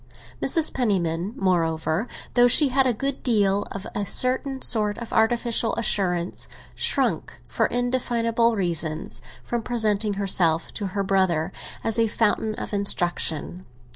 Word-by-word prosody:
Mrs. 325 -3 +3
Penniman, 190 -5 -1
moreover, 170 0 0 0.3
though 245 0 +5
she 280 +4 +6
had 265 0 +3
a - - +3
good 270 +4 -3
deal 205 -4 +1
of 195 - -7
a 205 - -2
certain 260 +6 +3
sort 210 -3 +1
of 235 - -8
artificial 230 0 +1
assurance, 180 -6 -1 0.3
shrank, - - -1
for - - 0
indefinable 235 -2 0
reasons, 165 -5 -1 0.2
from 240 -1 -3
presenting 215 -3 0
herself 175 -5 0
to 205 - -4
her 200 - +1
brother 190 -3 0 0.3
as 225 0 +1
a 225 - +3
fountain 220 0 0
of - - -6
instruction. 175 -3 -1
210 Hz, 135 wpm, -23 LUFS, 185-235 Hz, 0.3 s, she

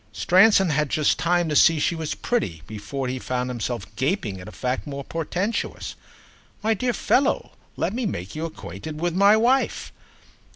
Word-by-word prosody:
Stransom 190 - +5
had 150 -1 +1
just 155 +2 +2
time 175 +1 +2
to 150 - -1
see 165 +2 +6
she 160 - +1
was 160 -2 -3
pretty 85 - -2
before 110 +6 -5
he 130 +1 -3
found 125 0 -2
himself 120 -3 -3
gaping 125 - -1
at 90 - -11
a - - -8
fact 125 +2 -3
more 140 -1 -5
portentous. 180 - -3 0.7
"My 225 +1 +3
dear 245 +4 -1
fellow, 270 +5 +1 0.3
let - - -1
me 240 -1 -1
make 95 - -5
you 155 +2 -3
acquainted 150 - -7
with 175 +1 0
my 200 +4 +5
wife." 250 +4 +1
160 Hz, 170 wpm, -24 LUFS, 125-195 Hz, 0.7 s, see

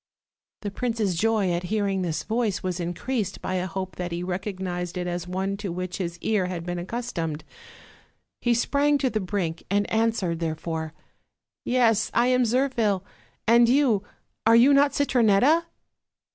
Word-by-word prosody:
The 205 - -3
prince's 225 -3 -1
joy 210 +1 +1
at 175 0 0
hearing 200 -3 0
this 170 -3 -2
voice 220 -3 -1
was 180 -1 -2
increased 195 +5 -3
by - - -4
a 185 0 -1
hope 185 -1 -5
that 180 -1 -4
he 170 +1 -3
recognized 180 -1 -4
it 180 - -2
as 175 0 -3
one 190 +2 -2
to 200 -3 -4
which 180 +1 -4
his 170 -2 -3
ear 210 -5 +1
had 175 -2 -5
been 175 0 -3
accustomed. 175 -7 -4 1.0
He 240 -1 +2
sprang 285 +4 +2
to 265 -3 0
the 215 - 0
brink, 180 -4 -2
and 205 +1 +1
.an 225 +1 +3
swered, 170 -6 -2
therefore: 160 -1 -3 0.7
"Yes, 230 -3 +3
I 235 - +4
am 250 -1 +3
Zirphil; 230 -6 +1 0.4
and 235 +1 +6
you, 250 -6 +3 0.5
are 225 - +7
you 250 +5 +7
not 280 +1 +4
Citronetta?" 265 +4 +3
200 Hz, 160 wpm, -25 LUFS, 180-235 Hz, 1.0 s, are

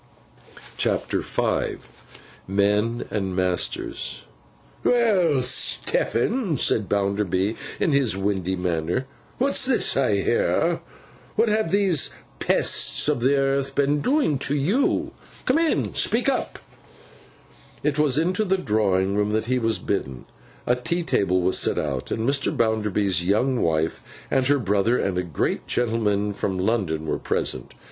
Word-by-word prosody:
CHAPTER - - 0
V - - -1 0.7
MEN 105 +4 +1
AND 95 -3 -2
MASTERS 90 -1 -2 0.6
'WELL, 190 - +3
Stephen,' 175 - +1
said 105 -4 +1
Bounderby, 100 0 0 0.2
in 165 - +1
his 135 -8 +2
windy 95 -2 -1
manner, 90 +6 -2 0.3
'what's 275 +2 +1
this 265 0 +2
I - - +2
hear? - - +1 0.6
What 230 - +2
have 215 -4 +1
these 190 -6 +2 0.3
pests - - +2
of 150 -4 +1
the 130 +4 +2
earth 135 0 0
been 145 +1 +2
doing 255 - +1
to 140 +1 +2
you? 190 - +1 0.3
Come 260 +5 +3
in, 330 -1 +2
and - - -3
speak - - +1
up.' - - -1 1.3
It 150 0 0
was 145 -3 +3
into 180 +6 +1
the 190 -2 +1
drawing 100 - +1
room 105 0 +1
that 110 +1 -1
he 125 +2 0
was 115 -3 +1
thus - - -14
bidden. 65 -11 -3 0.4
A 125 - +2
tea 170 +8 -2
table 95 - +1
was 95 - +3
set - - +1
out; 70 -4 -3
and 110 +1 -2
Mr. 140 0 +1
Bounderby's 105 -5 0
young 120 +7 +1
wife, 80 0 0 0.3
and 130 -1 +2
her 145 +1 +4
brother, 105 0 +1
and 90 -2 -1
a - - +1
great 85 -6 -2
gentleman 105 -4 0
from 95 -1 -3
London, 90 -6 -1
were 75 - -2
present. 65 - -3
115 Hz, 140 wpm, -23 LUFS, 95-145 Hz, 1.3 s, her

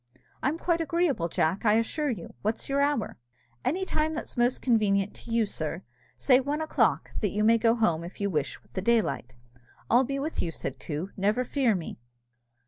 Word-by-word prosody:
"It's 300 +5 0
quite 340 -1 +1
agreeable, 320 - +1
Jack, 170 +2 0
I 210 -2 +4
assure 230 +7 +1
you; 210 -9 -5
what's 220 +2 -2
your 280 0 +1
hour?" 285 - 0 0.4
"Any 370 +7 0
time 315 -2 0
that's 315 - -5
most 245 +1 +2
convenient 205 -5 +2
to - - -10
you, 230 -1 +3
sir 165 -1 -4 0.3
say 255 -2 +5
one 285 +3 -2
o'clock, 315 0 +1
that 210 - 0
you 210 +3 -1
may 230 +1 +5
go 230 0 +4
home, 170 -8 +1
if 175 - -9
you 200 - 0
wish, 150 -7 -2
with - - -28
the 185 - -2
daylight." 215 - +1 0.6
"I'll 245 +3 +6
be 275 +2 -2
with 300 +4 -2
you," 170 - -1
said 135 -4 -5
Coo, 165 +5 -4
"never 210 +6 +1
fear 250 -4 +1
me." 165 -9 -6
230 Hz, 195 wpm, -28 LUFS, 190-280 Hz, 0.6 s, I'll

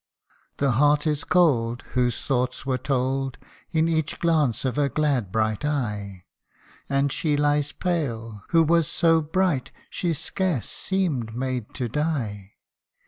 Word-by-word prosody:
The 140 -2 +2
heart 145 +5 +3
is 150 -2 0
cold, 120 -10 +2
whose 125 -1 0
thoughts 125 -1 -1
were 130 -1 0
told 135 0 -1 0.3
In 160 0 +2
each 160 -2 0
glance 155 -9 +1
of 130 - 0
her 145 -1 +2
glad 135 -10 0
bright 110 0 0
eye; 105 -10 -3 0.6
And 140 0 +1
she 150 0 0
lies 145 0 +2
pale, 115 - -3
who 165 -1 +5
was 165 0 +3
so 165 -1 +3
bright, 160 -3 0 0.2
She 175 -2 -1
scarce 165 - -2
seemed 150 - -2
made 125 -3 -3
to 125 -3 -2
die. 115 -8 -2
140 Hz, 140 wpm, -25 LUFS, 120-160 Hz, 0.6 s, who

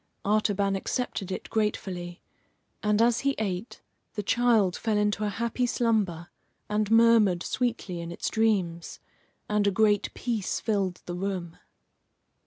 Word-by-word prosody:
Artaban 205 -1 +2
accepted 195 -2 -3
it - - -5
gratefully; 185 -5 -2 0.6
and, 210 +1 +3
as 235 -1 +3
he 275 0 0
ate, 195 +1 -4 0.3
the 210 - -2
child 225 -5 +3
fell 220 -2 0
into 210 0 +1
a - - 0
happy 235 +3 -1
slumber, 210 -9 0 0.4
and 210 0 0
murmured 225 -6 +5
sweetly 230 -8 -2
in 170 0 -6
its - - -4
dreams, 190 -7 0 0.5
and 210 -1 +1
a - - +6
great 205 0 +2
peace 230 -5 -2
filled 195 -5 -1
the 175 - -5
room. 180 -2 -3
210 Hz, 135 wpm, -27 LUFS, 185-225 Hz, 0.6 s, a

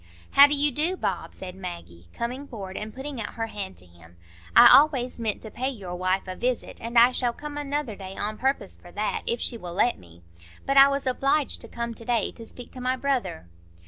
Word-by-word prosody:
"How 280 +1 +9
do 290 - +1
you 290 +1 +2
do, 320 +8 0
Bob?" - - -3
said 185 -1 -7
Maggie, 170 - -9
coming 255 +4 -5
forward 195 -6 -8
and 215 +1 -5
putting 265 0 -6
out - - -6
her 225 - -2
hand 200 -4 -6
to - - -8
him; 85 -1 -19 0.4
"I - - +10
always 265 -5 +5
meant 220 -3 -2
to 220 - -8
pay 260 +2 -2
your 195 -9 -6
wife 185 +1 0
a 185 -1 -5
visit, 250 +3 -2
and 235 +1 -3
I 240 +2 +8
shall 245 -1 0
come 295 +3 -8
another 290 -5 -2
day 190 -1 -9
on 215 +1 -3
purpose 265 -6 -1
for 175 - -16
that, 210 0 -2
if 235 - 0
she 235 - -2
will 175 -3 -7
let 240 +5 +2
me. 85 0 -18 0.4
But 275 0 +1
I 275 0 +10
was 280 0 -1
obliged 275 +2 +1
to - - -9
come 235 0 -4
to 230 - -12
day 230 -2 0
to 230 - -11
speak 245 - -11
to 255 - -9
my 255 +1 +1
brother." 260 - -2
235 Hz, 230 wpm, -26 LUFS, 190-270 Hz, 0.4 s, I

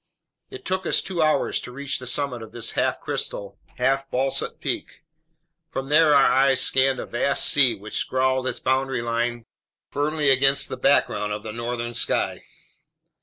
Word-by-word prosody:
It 395 - -10
took 185 0 -2
us - - +3
two 180 -3 -3
hours 155 -1 +1
to - - -9
reach 140 +2 -4
the 125 - -8
summit 125 -2 -1
of 110 - -10
this 120 -1 -2
half - - 0
crystal, 100 0 -4 0.2
half 135 +2 0
basalt 135 +1 -2
peak. - - -5 0.7
From 135 +1 -5
there 155 0 +5
our 140 - +6
eyes 135 0 +3
scanned 135 0 +2
a - - -4
vast 135 +3 +1
sea, 135 -4 +5
which 105 +2 -7
scrawled 130 0 0
its - - -3
boundary 130 -1 0
line 120 0 -2 0.5
firmly 145 0 +1
against 135 +1 +3
the - - -4
background 105 0 +2
of 105 0 -6
the 110 - -6
northern 120 0 -4
sky. - - -1
130 Hz, 170 wpm, -23 LUFS, 120-140 Hz, 0.7 s, our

